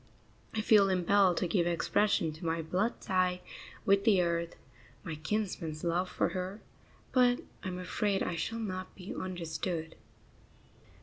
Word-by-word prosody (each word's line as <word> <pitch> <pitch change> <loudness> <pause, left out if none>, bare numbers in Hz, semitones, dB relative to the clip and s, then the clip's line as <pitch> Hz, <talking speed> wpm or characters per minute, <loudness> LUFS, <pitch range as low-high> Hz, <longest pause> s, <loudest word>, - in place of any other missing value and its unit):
I 215 - +1
feel 210 -3 +5
impelled 185 0 +3
to 180 - +1
give 175 -1 +2
expression 170 -1 +2
to 160 - -12
my 165 0 -1
blood 190 +8 0
tie 185 -2 +1 0.4
with 200 0 +4
the 210 -4 +5
earth, 170 0 -1 0.5
my 165 -5 -4
kinsman's 160 -2 -3
love 175 +2 0
for - - 0
her; 185 +2 -4 0.5
but 245 -1 +4 0.2
I - - -4
am 180 -1 -3
afraid 195 +2 0
I 175 - -2
shall 225 +7 -2
not 185 -4 -4
be 185 0 -7
understood. 165 -2 -4
185 Hz, 145 wpm, -31 LUFS, 170-200 Hz, 0.5 s, feel